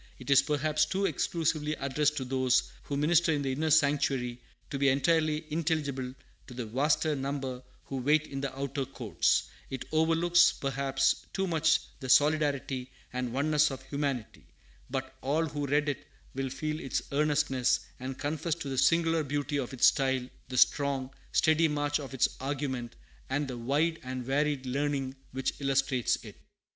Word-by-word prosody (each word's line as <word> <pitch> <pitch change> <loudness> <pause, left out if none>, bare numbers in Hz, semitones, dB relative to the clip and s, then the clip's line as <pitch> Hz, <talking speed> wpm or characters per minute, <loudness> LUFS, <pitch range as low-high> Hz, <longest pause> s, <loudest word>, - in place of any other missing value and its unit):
It - - -5
is 135 - +7
perhaps 155 +1 +1
too 195 +3 0
exclusively 155 -5 0
addressed 150 +2 0
to 130 - -2
those 130 -1 +1
who 140 - -3
minister 160 +2 +3
in 145 -1 -1
the 135 - -1
inner 155 +4 -1
sanctuary, 140 -5 +2 0.3
to 140 - -3
be 140 0 +4
entirely 155 +3 +2
intelligible 145 -6 -1 0.3
to 125 - -10
the 125 -2 -4
vaster 145 +6 +1
number 135 -2 -3 0.2
who 135 - -5
wait 150 +4 +2
in 135 -2 -5
the 140 -2 -2
outer 140 0 -2
courts; 135 +1 +1 0.3
it 135 - -5
overlooks, 165 +2 +4
perhaps, 135 0 0
too 195 - 0
much 160 -3 +3 0.2
the 130 -3 -6
solidarity 145 -3 +2 0.2
and 125 -1 -2
oneness 150 +3 +3
of 135 -1 -7
humanity;' 140 -5 -3 0.4
but 130 0 -4
all 150 +5 +1
who 145 -2 -3
read 145 +2 +2
it 145 - -3 0.3
will 135 0 -2
feel 155 +3 -3
its 135 - -2
earnestness, 140 -3 +2 0.2
and 130 +1 -5
confess 155 +3 -2
to 145 -4 -6
the 135 -1 -1
singular 165 -1 +3
beauty 145 0 -2
of 130 -1 -3
its 130 -3 +3
style, 130 -2 +3 0.2
the 125 - -4
strong, 135 -1 +2 0.2
steady 160 0 +4
march 145 -1 0
of 135 -2 -7
its 130 - +4
argument, 130 -3 -3 0.3
and 145 0 0
the 130 - -5
wide 145 +8 0
and 130 -1 -5
varied 140 0 0
learning 135 0 -1 0.2
which 135 0 -2
illustrates 135 -2 +1
it. - - -11
140 Hz, 165 wpm, -30 LUFS, 130-150 Hz, 0.4 s, is